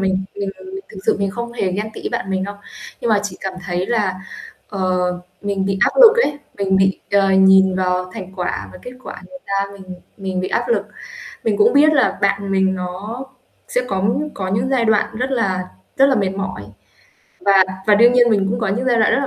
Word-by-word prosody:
mình 190 0 0
mình 200 -1 -3
mà - - -13
mình 380 +1 -7
thực 200 - -11
sự - - +3
mình 200 -1 0
không 235 +3 -5
hề 195 -6 -1
ghen 210 +3 -3
tị - - -8
với - - -2
bạn 195 - -3
mình 190 0 -1
đâu. 200 +1 -6 0.5
Nhưng 235 - -2
mà - - +5 0.2
mình 185 - -12
cảm 190 -1 -4
thấy 180 +1 -2
là, 210 -5 0 0.5
ờ, 200 -2 -5 0.6
mình 200 -1 -1
bị 195 -1 -1
áp - - +4
lực 465 -1 +9
ấy, 290 0 -3 0.2
mình 190 -1 +1
bị, 190 0 +2
ờ, 200 -1 +3
nhìn 190 0 +5
vào 185 0 -1
thành 185 0 -8
quả 180 -1 -3
và 185 - -11
kết 250 - -8
quả - - -8
người 275 - -10
ta, 195 0 0
mình 190 -2 -10 0.2
mình 190 -2 -3
bị 185 - -3
áp - - -1
lực. 475 - +1 0.6
Mình 215 -3 +1
cũng 210 - +5
biết 300 +2 +5
là 280 -4 +2
bạn 200 0 0
mình 190 0 +2
nó 190 +8 -5 0.4
sẽ 250 - 0
có 190 -1 -1 0.3
có 190 -1 -4
những 210 +6 0
giai 250 -3 +2
đoạn 215 0 +1
rất 255 +3 -2
là 190 -8 -1 0.3
rất 270 - +6
là 270 - +3
mệt 200 -5 +1
mỏi, 190 - -4 0.8
và 195 -1 +5 0.2
và 210 - +6
đương 235 +4 +6
nhiên 245 -1 +5
mình 195 -3 +2
cũng 235 +2 -2
có 215 - 0
những 230 +7 -1
giai 245 -2 +3
đoạn 220 - +4
rất - - +3
là 275 - -1
200 Hz, 235 wpm, -19 LUFS, 190-235 Hz, 0.8 s, lực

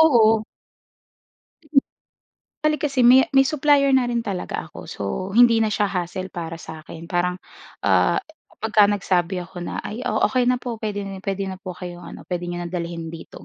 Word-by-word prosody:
oo. 225 -8 +5 2.2
Bale, 305 -2 +2
kasi 275 -4 +1
may 255 +2 +7
may 270 - +7
supplier 280 -1 +3
na 255 -2 +3
rin 235 -1 -1
talaga 195 -4 -3
ako. - - -11
So, - - -6 0.3
hindi 235 -2 +6
na 220 - +3
siya 210 0 +1
hassle 185 -1 -3
para 165 -1 -5
sa'kin. 160 0 -10
Parang, 180 +1 0 0.5
ah, - - +4 0.4
pagka 215 -2 +4
nagsabi 185 -3 0
ako 175 +1 -10
na, 175 - -5
"Ay, 215 +3 -5
oo, - - 0
okey 250 -1 +2
na 250 - +3
po. 240 -3 -6
Puwede 205 -2 -3 0.2
puwede 195 0 -2
na 190 -1 -6
po 185 -2 -7
kayong 175 -1 -7
ano, - - -10
puwede 175 -1 -4
niyo 175 0 -4
nang 170 - -7
dalhin 170 -2 -4
dito," 165 - -10
200 Hz, 175 wpm, -22 LUFS, 175-245 Hz, 2.2 s, may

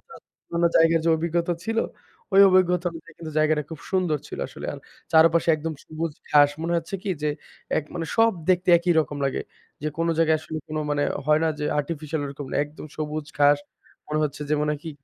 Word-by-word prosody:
অন্য - - -38 0.4
অন্যান্য 170 0 +3
জায়গার 165 0 +5
যে 165 - +3
অভিজ্ঞতা 170 +2 0
ছিল, 225 +2 -1 0.5
ওই 195 - +7
অভিজ্ঞতা 180 -1 +3
অনুযায়ী, 165 0 -12 0.2
জায়গাটা 155 0 +2
খুব 160 - -7
সুন্দর 180 -5 +1
ছিল - - -7
আসলে। - - -8
আর - - -7 0.3
চারপাশে 165 +1 +5
একদম 160 +1 -4
সবুজ 160 0 -4 0.2
ঘাস। 145 -1 +6
মনে 170 +1 -1
হচ্ছে 170 - -4
কি? 200 - -2
যে, 150 - +1 0.5
এক 155 - -3
মানে 165 -2 -3
সব 225 0 +5 0.2
দেখতে 180 0 +1
একই 175 +1 +1
রকম 145 -2 -4
লাগে। 135 - -1 0.4
যে 155 - 0
কোনো 165 0 +1
জায়গায় 160 -1 +4
আসলে 155 0 -7 0.3
মানে, 145 0 +1 0.2
হয় 150 0 +4
না - - +2
যে, - - -1
আর্টিফিশিয়াল 155 0 -3
ওরকম 140 0 -7
না, - - -2
একদম 150 +1 -11
সবুজ 155 -1 -4
ঘাস। 145 0 +5 0.5
মনে 150 0 -1
হচ্ছে 145 0 -4
যে, 150 - +2
মনে 150 - +1
হয় 150 - -5
কি? 165 - -4
160 Hz, 200 wpm, -24 LUFS, 150-170 Hz, 0.5 s, ওই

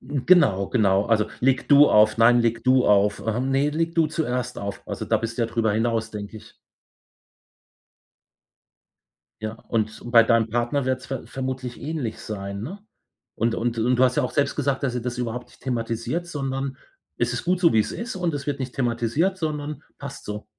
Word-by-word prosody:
Genau, 130 - +3
genau. 100 -4 +2
Also, 110 -2 +2
„leg 130 +1 +1
du 145 0 +7
auf.“ 105 0 +5
„Nein, 120 +1 +6
leg 115 -1 0
du 130 0 +4
auf.“ 105 0 +3
Ähm, 120 +4 -1
„ne, 140 +2 +2
leg 165 +2 -1
du 165 -2 +3
zuerst 125 -6 -2
auf.“ 100 0 -5
Also, - - -4
da - - +2
bist 115 +1 -5
du 120 - +2
ja - - +1
drüber 115 -2 0
hinaus, 110 0 0
denke 105 0 -7
ich. - - -17 2.9
Ja, 110 0 -3
und 110 -1 -2
bei 115 -1 +8
deinem 115 -1 +2
Partner 120 +4 0
wird 130 0 -1
es - - -11
ver 135 -2 -6
vermutlich 130 -2 -5
ähnlich 145 -7 -4
sein, 100 -1 -6
ne? 180 - -6 0.6
Und 115 +1 0
und 120 0 -2
und 125 +3 +2
du 130 - +5
hast 125 -1 +3
ja - - +3
auch 125 - -2
selbst 140 0 0
gesagt, 140 -2 -1
dass 130 -3 -1
ihr 125 - -2
das 125 0 -4
überhaupt 125 0 -4
nicht - - -22
thematisiert, 120 +6 -2
sondern 135 -4 -3 0.4
es 120 0 0
ist 125 - -3
gut 180 +1 +1
so, 170 -2 +5
wie 110 - +3
es - - 0
ist 230 -3 -5
und 175 -3 -1
es 145 0 -5
wird 140 -1 -2
nicht 130 -1 -4
thematisiert, 125 +9 0
sondern 150 -3 -4 0.2
passt 140 0 -8
so. 105 0 -5
125 Hz, 200 wpm, -24 LUFS, 115-140 Hz, 2.9 s, bei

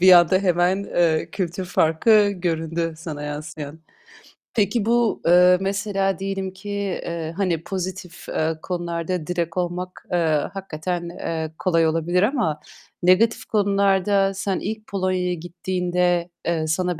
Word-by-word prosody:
bir 185 0 +8
anda 175 +1 +7
hemen, 180 +1 +2
eee, 165 -4 +1
kültür 185 -1 -3
farkı 200 +6 +4
göründü 165 -2 -2
sana 155 -3 -6
yansıyan. 150 +1 -6 0.7
Peki 210 +1 +1
bu, 235 -1 +2
eee, 180 +1 +6
mesela 195 -2 0
diyelim 195 -1 -3
ki, 190 +2 -10
eee, 170 -5 -3
hani, 175 -5 0
pozitif, 185 -1 -5
eee, 160 0 -1
konularda 175 -1 -3
direkt 170 -1 -2
olmak, 180 +1 -3
eee, 175 - +2 0.4
hakikaten, 175 -2 -4
eee, 160 -2 -4
kolay 165 -3 +3
olabilir 170 +4 +1
ama 215 - +1 0.4
negatif 225 +5 +4
konularda 200 -1 +2
sen 195 -1 -2
ilk 215 +1 -5
Polonya'ya 185 -2 0
gittiğinde, 175 0 -1 0.2
eee, 160 -2 0
sana 180 +1 0
180 Hz, 125 wpm, -23 LUFS, 165-195 Hz, 0.7 s, bir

